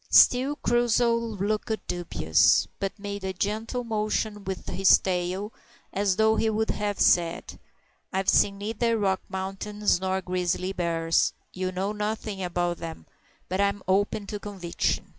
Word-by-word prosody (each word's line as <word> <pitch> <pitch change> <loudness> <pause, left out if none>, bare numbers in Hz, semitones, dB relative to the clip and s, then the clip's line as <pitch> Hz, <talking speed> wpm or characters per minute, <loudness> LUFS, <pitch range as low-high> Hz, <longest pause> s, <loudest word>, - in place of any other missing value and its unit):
Still 260 +4 +6
Crusoe 240 -1 +2
looked 215 -2 -2
dubious, 170 - +2
but 195 +1 -3
made 200 -1 -6
a 190 0 -2
gentle 220 +6 -2
motion 215 -2 -2
with 190 -1 -5
his 195 0 +5
tail, 185 +3 -2 0.4
as 195 -1 +1
though 220 +2 +3
he 225 - +2
would 220 +1 0
have 205 -1 -2
said, 170 -1 +2 0.5
"I've 190 0 -1
seen 200 -1 +4
neither 225 +3 0
Rocky 195 -3 +1
Mountains 195 +1 -1
nor 190 0 0
grizzly 180 +1 -1
bars, 165 -2 +1 0.2
and 185 0 -3
know 195 +3 -1
nothin' 210 -1 -3
about 175 -1 -1
'em, 165 -1 -7 0.4
but 185 +2 -1
I'm 200 0 0
open 200 +2 +1
to 205 0 -5
conviction." 190 -5 -2
200 Hz, 140 wpm, -26 LUFS, 185-215 Hz, 0.5 s, Still